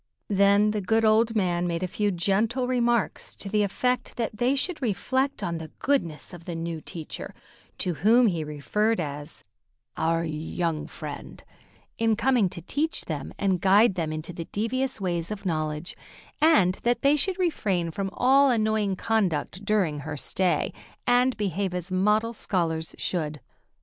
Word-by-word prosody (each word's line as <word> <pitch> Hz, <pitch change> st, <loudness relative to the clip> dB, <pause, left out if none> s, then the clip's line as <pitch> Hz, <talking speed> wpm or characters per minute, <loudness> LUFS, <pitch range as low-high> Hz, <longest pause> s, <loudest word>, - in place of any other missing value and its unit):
Then 200 Hz, +1 st, +4 dB
the 210 Hz, -1 st, -2 dB
good 220 Hz, +4 st, +2 dB
old 225 Hz, +1 st, +3 dB
man 175 Hz, -4 st, +1 dB
made 170 Hz, +1 st, -2 dB
a -, -, 0 dB
few 205 Hz, +3 st, 0 dB
gentle 210 Hz, +8 st, 0 dB
remarks 240 Hz, -3 st, 0 dB
to -, -, -8 dB
the 210 Hz, +1 st, +2 dB
effect 250 Hz, +5 st, -1 dB
that 230 Hz, -3 st, -2 dB
they 245 Hz, +5 st, +2 dB
should 325 Hz, +4 st, -1 dB
reflect 260 Hz, +4 st, -1 dB
on 170 Hz, -1 st, -2 dB
the 160 Hz, -1 st, -8 dB
goodness 175 Hz, -, -1 dB
of 170 Hz, -1 st, -11 dB
the 175 Hz, -, -5 dB
new 165 Hz, -1 st, -4 dB
teacher, 160 Hz, -1 st, -7 dB, 0.4 s
to 180 Hz, -, 0 dB
whom 220 Hz, -, +4 dB
he 170 Hz, -7 st, +1 dB
referred 210 Hz, +9 st, 0 dB
as 145 Hz, -1 st, -6 dB, 0.5 s
"our 165 Hz, +1 st, +1 dB
young 160 Hz, +1 st, -3 dB
friend," -, -, -8 dB, 0.6 s
in 225 Hz, -1 st, +3 dB
coming 240 Hz, -4 st, +2 dB
to 175 Hz, -3 st, -8 dB
teach 300 Hz, -, -1 dB
them 145 Hz, -4 st, -4 dB
and 190 Hz, -3 st, +1 dB
guide 200 Hz, +3 st, +5 dB
them 165 Hz, -4 st, -2 dB
into 155 Hz, +3 st, -5 dB
the 165 Hz, -1 st, -6 dB
devious 245 Hz, +6 st, -2 dB
ways 175 Hz, -3 st, -2 dB
of 210 Hz, -2 st, -6 dB
knowledge, 155 Hz, -1 st, -2 dB, 0.5 s
and 210 Hz, -, +4 dB
that 240 Hz, 0 st, 0 dB
they 280 Hz, +2 st, +5 dB
should 370 Hz, +5 st, 0 dB
refrain 200 Hz, -, 0 dB
from 195 Hz, +3 st, -3 dB
all 270 Hz, +5 st, +4 dB
annoying 215 Hz, -4 st, +1 dB
conduct 190 Hz, -4 st, -1 dB
during 195 Hz, -8 st, +1 dB
her 150 Hz, +1 st, -5 dB
stay, 185 Hz, +5 st, +1 dB, 0.3 s
and 250 Hz, +1 st, +3 dB
behave 195 Hz, -2 st, -1 dB
as 180 Hz, +1 st, -4 dB
model 210 Hz, +5 st, +2 dB
scholars 165 Hz, -7 st, -2 dB
should. 155 Hz, -4 st, -2 dB
195 Hz, 160 wpm, -26 LUFS, 170-230 Hz, 0.6 s, guide